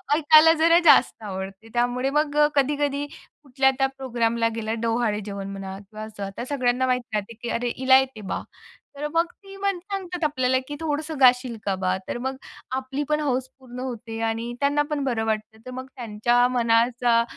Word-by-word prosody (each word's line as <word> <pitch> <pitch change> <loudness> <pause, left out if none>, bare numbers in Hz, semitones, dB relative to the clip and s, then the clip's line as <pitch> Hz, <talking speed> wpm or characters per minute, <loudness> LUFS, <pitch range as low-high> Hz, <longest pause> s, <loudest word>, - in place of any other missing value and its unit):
ऐकायला 310 +1 +7
जरा 335 +1 +6
जास्त 230 - +5
आवडतं. 195 +2 -6
त्यामुळे 245 +2 +1
मग 295 0 0 0.2
कधी-कधी 285 +1 +1
कुठल्या 270 -3 -1
त्या 270 - +4
प्रोग्रामला 235 -3 0
गेलं, 220 0 -3
डोहाळेजेवण 210 -4 -1
म्हणा 195 -1 -6
किंवा 215 0 -7 0.2
आता 200 +5 -6
सगळ्यांना 255 -2 0
माहीत 250 -3 -1
असतं 210 +2 -3
की 240 - -4
"अरे, 240 +1 -1
हिला 260 0 +6
येतंय 265 -5 -4
बा," - - -2 0.6
तर 295 +1 -2
मग 335 +1 +3
ती 390 -1 -14
म्हणतात 375 -2 -3
आपल्याला 260 -3 +2
की 290 - -5
"थोडंसं 310 -1 -3
गाशील 250 -2 +4
का 195 -1 +1
बा?" 185 0 +1
तर - - -3
मग 265 +2 -4 0.4
आपली 265 +2 -3
पण 300 0 +2
हौस 260 -2 -1
पूर्ण 250 -1 -10
होते 230 -3 -5
आणि 230 +2 -3
त्यांनापण 290 0 0
बरं 230 -4 -1
वाटतं. 220 0 -3
तर 255 - -7
मग 260 +1 -6
त्यांच्या 240 +1 +2
मनाचा 235 0 +2
250 Hz, 165 wpm, -24 LUFS, 230-290 Hz, 0.6 s, ऐकायला